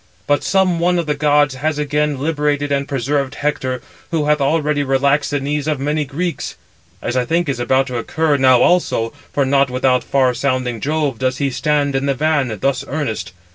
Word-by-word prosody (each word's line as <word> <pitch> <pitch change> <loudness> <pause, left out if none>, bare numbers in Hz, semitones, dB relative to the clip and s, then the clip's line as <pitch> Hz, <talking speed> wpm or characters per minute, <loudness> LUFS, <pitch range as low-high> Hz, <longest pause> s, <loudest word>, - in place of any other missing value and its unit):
But 145 0 +2
some 185 -3 +2
one 175 +1 +2
of 170 - -1
the 150 - 0
gods 145 -1 +2
has 150 +3 -2
again 150 0 0
liberated 145 -1 -1
and 140 0 0
preserved 140 +1 -1
Hector, 130 -4 -2 0.3
who 160 -3 0
hath 150 0 +2
already 150 0 +1
relaxed 140 +1 +1
the 145 - -1
knees 145 +2 -2
of 150 -3 0
many 150 +2 -1
Greeks; 165 +5 -4 0.5
as 120 - -2
I 125 - +2
think 165 +6 0
is 135 -4 -2
about 130 +2 +2
[to 125 -2 -3
occur] 160 +5 0
now 130 -2 +5
also, 145 -10 +1 0.2
for 140 - +1
not 140 0 +3
without 125 0 +1
far 130 -2 +2
sounding 125 -3 -1
Jove 145 -5 -1
does 130 0 0
he 140 -2 -1
stand 140 +2 0
in 135 +1 0
the 140 - +1
van, 145 -6 0
thus 135 -1 0
earnest. 140 -6 -3
140 Hz, 195 wpm, -18 LUFS, 130-150 Hz, 0.5 s, now